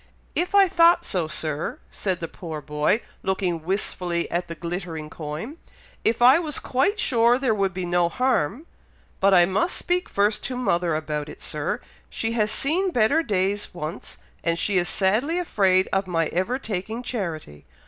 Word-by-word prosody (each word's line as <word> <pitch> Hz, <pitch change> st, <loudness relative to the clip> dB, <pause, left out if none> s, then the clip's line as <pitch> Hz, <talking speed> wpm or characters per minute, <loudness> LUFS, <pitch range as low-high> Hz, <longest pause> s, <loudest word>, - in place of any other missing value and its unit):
"If 360 Hz, +3 st, -1 dB
I 395 Hz, -1 st, +7 dB
thought 340 Hz, 0 st, +4 dB
so, 180 Hz, -5 st, -1 dB
Sir," 155 Hz, 0 st, -2 dB
said 185 Hz, -4 st, -2 dB
the 165 Hz, -, -3 dB
poor 160 Hz, -3 st, -7 dB
boy, 150 Hz, -, 0 dB, 0.2 s
looking 185 Hz, -3 st, -1 dB
wistfully 175 Hz, -1 st, -1 dB
at 175 Hz, +1 st, -1 dB
the 170 Hz, -, -6 dB
glittering 170 Hz, -2 st, -5 dB
coin. 160 Hz, -, -6 dB, 0.5 s
"If 230 Hz, +2 st, +1 dB
I 260 Hz, +6 st, +8 dB
was 310 Hz, -4 st, -1 dB
quite 340 Hz, +12 st, 0 dB
sure 235 Hz, 0 st, +3 dB
there 255 Hz, -4 st, +1 dB
could 195 Hz, -2 st, +1 dB
be 185 Hz, 0 st, -4 dB
no 175 Hz, 0 st, +2 dB
harm, 250 Hz, -, 0 dB, 0.5 s
but 195 Hz, +1 st, +4 dB
I 175 Hz, -1 st, +7 dB
must 200 Hz, -, 0 dB
speak 360 Hz, 0 st, -1 dB
first 205 Hz, +2 st, +1 dB
to 255 Hz, -, -3 dB
mother 175 Hz, -9 st, +1 dB
about 150 Hz, -1 st, -3 dB
it, -, -, -10 dB
Sir! -, -, -3 dB, 0.3 s
She 225 Hz, -, -2 dB
has 215 Hz, -2 st, +1 dB
seen 330 Hz, -, +1 dB
better 265 Hz, +2 st, +3 dB
days 200 Hz, -, -1 dB
once, 155 Hz, 0 st, -6 dB, 0.3 s
and 170 Hz, 0 st, +1 dB
she 190 Hz, +2 st, +2 dB
is 175 Hz, -, -1 dB
sadly 220 Hz, -, +1 dB
afraid 190 Hz, -, +2 dB
of 195 Hz, 0 st, +1 dB
my 165 Hz, -2 st, +1 dB
ever 190 Hz, +9 st, -1 dB
taking 220 Hz, 0 st, -4 dB
charity. 165 Hz, -, -5 dB
190 Hz, 170 wpm, -24 LUFS, 170-245 Hz, 0.5 s, I